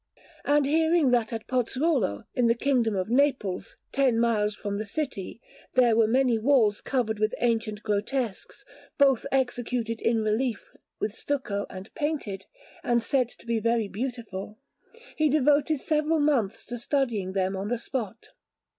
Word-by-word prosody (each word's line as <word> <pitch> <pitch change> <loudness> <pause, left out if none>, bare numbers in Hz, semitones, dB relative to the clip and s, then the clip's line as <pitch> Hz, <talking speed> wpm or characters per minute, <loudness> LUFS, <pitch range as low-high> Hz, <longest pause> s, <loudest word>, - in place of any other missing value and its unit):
And 290 0 +3
hearing 320 -1 +3
that 235 -3 +2
at 225 -1 -5
Pozzuolo, 255 - 0
in 245 -1 +2
the 230 - +3
Kingdom 240 -4 +1
of 185 +3 -2
Naples, 250 -8 0
ten 260 -4 +2
miles 215 -3 +1
from 205 -1 -4
the 215 - -3
city, 235 -5 -4 0.4
there 245 -3 +5
were 225 -1 +4
many 250 -1 +2
walls 225 -4 +3
covered 225 -5 -1
with 215 +1 +1
ancient 225 -3 -1
grotesques, 220 +1 -2 0.3
both 275 -4 +3
executed 245 -3 -1
in 225 -1 +1
relief 220 +2 -1 0.3
with 210 - -2
stucco 215 -7 -3
and 190 +2 -10
painted, 285 - -3 0.4
and 235 -1 +1
said 255 -2 +1
to - - -13
be 230 -1 0
very 230 -1 +1
beautiful, 215 -2 -5 0.6
he 310 -1 +2
devoted 295 +1 +3
several 310 +2 +1
months 240 -8 +1
to 240 0 -6
studying 235 -8 -1
them 190 0 0
on 195 +1 -3
the 245 +2 0
spot. 230 -2 -5
235 Hz, 150 wpm, -27 LUFS, 215-270 Hz, 0.6 s, there